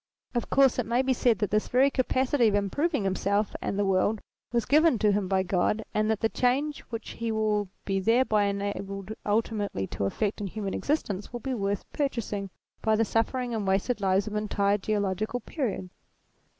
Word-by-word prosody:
Of 240 - -2
course 270 -2 +4
it 235 - -1
may 240 +3 +2
be 260 0 +2
said 240 -2 +2
that 210 - -1
this 215 +1 +1
very 265 +3 +4
capacity 255 -1 +2
of 205 - +2
improving 280 - 0
himself 200 +2 0
and 200 - -2
the 205 - +2
world 195 +3 +2 0.3
was 235 -1 +1
given 305 -2 +4
to 210 -1 +3
him 200 -1 0
by 190 0 +2
God, 190 +4 0
and 215 0 +1
that 220 -1 0
the 225 - +3
change 270 +6 0
which 230 -2 -5
he 230 -1 -3
will 210 -2 0 0.2
be 195 -1 0
thereby 220 0 +3
enabled 200 0 -3
ultimately 205 - 0
to 100 - -3
effect 205 - -1
in 200 - -2
human 200 0 -4
existence 210 -10 -2
will 240 - -5
be 265 +3 -3
worth 200 -3 -1
purchasing 225 -8 -2 0.3
by 220 0 +3
the 225 +1 +2
sufferings 240 +3 0
and 210 -3 -2
wasted 200 +4 +1
lives 195 +1 +2
of 215 - -6
entire 205 -1 +1
geolo 200 -1 0
gical 220 +5 -3
periods. 215 - -3
215 Hz, 190 wpm, -28 LUFS, 200-245 Hz, 0.3 s, course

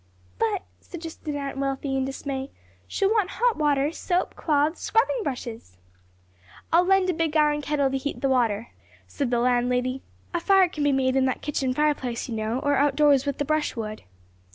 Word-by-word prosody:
"But," 430 -4 0 0.2
suggested 325 -3 -7
Aunt 275 -1 -4
Wealthy 275 0 -2
in 265 0 0
dismay, 270 0 -4 0.4
"she'll 395 0 +1
want 420 -4 +2
hot 485 -2 +2
water, 290 -1 +1
soap, 355 +2 -1
cloths, 300 +1 +1
scrubbing 465 +2 +1
brushes!" 235 - -6 1.0
"I'll 340 +2 +6
lend 380 -1 +3
a - - -3
big 320 -1 0
iron 300 -1 +3
kettle 285 -2 0
to 270 - 0
heat 285 +2 -4
the 275 - +2
water," 235 -4 +1 0.4
said 280 -4 -3
the 240 - +1
landlady; 250 +1 +1 0.3
"a 345 - +1
fire 385 +1 +5
can 300 -3 -3
be 290 - +3
made 265 -1 +1
in 265 -1 +3
that 260 - -2
kitchen 275 -3 -1
fireplace, 280 -6 0
you 240 - -5
know, 220 +2 -1
or 285 -1 +2
out 285 -1 +2
doors, 285 -2 +4
with 280 - -1
the 290 - -1
brush 310 0 0
wood." 215 -2 -5
285 Hz, 185 wpm, -25 LUFS, 260-315 Hz, 1.0 s, I'll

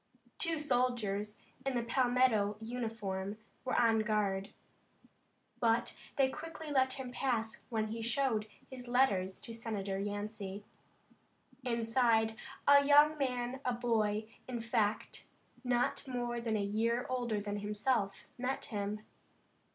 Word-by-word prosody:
Two 330 -2 +2
soldiers 245 -7 0 0.3
in 270 -1 -1
the 240 - +1
Palmetto 245 -4 +3
uniform 220 -4 -3 0.3
were 255 - +1
on 225 -1 +4
guard, 210 -3 0 1.1
but 230 0 +2 0.2
they 270 -1 +4
quickly 315 +2 -6
let 260 -2 +3
him 260 -2 -5
pass 235 -4 -1
when 220 -3 -1
he 225 +1 -4
showed 230 -2 +1 0.2
his 250 -2 -9
letters 200 -7 +2
to 245 -5 -8
Senator 205 -4 -3
Yancey. 205 0 -4 1.0
Inside, 230 -2 +2 0.3
a 285 0 +8
young 295 +2 +7
man, 250 -1 -1
a 250 - +1
boy, 220 -3 +1 0.2
in 250 -2 -3
fact, 225 -2 -1 0.4
not 245 +1 +1
more 240 -2 -2
than 225 -2 0
a 205 - 0
year 230 +4 +1
older 240 -4 -1
than 205 0 -3
himself, 210 0 0
met 255 +2 -1
him. 210 -1 -3
230 Hz, 125 wpm, -34 LUFS, 210-255 Hz, 1.1 s, a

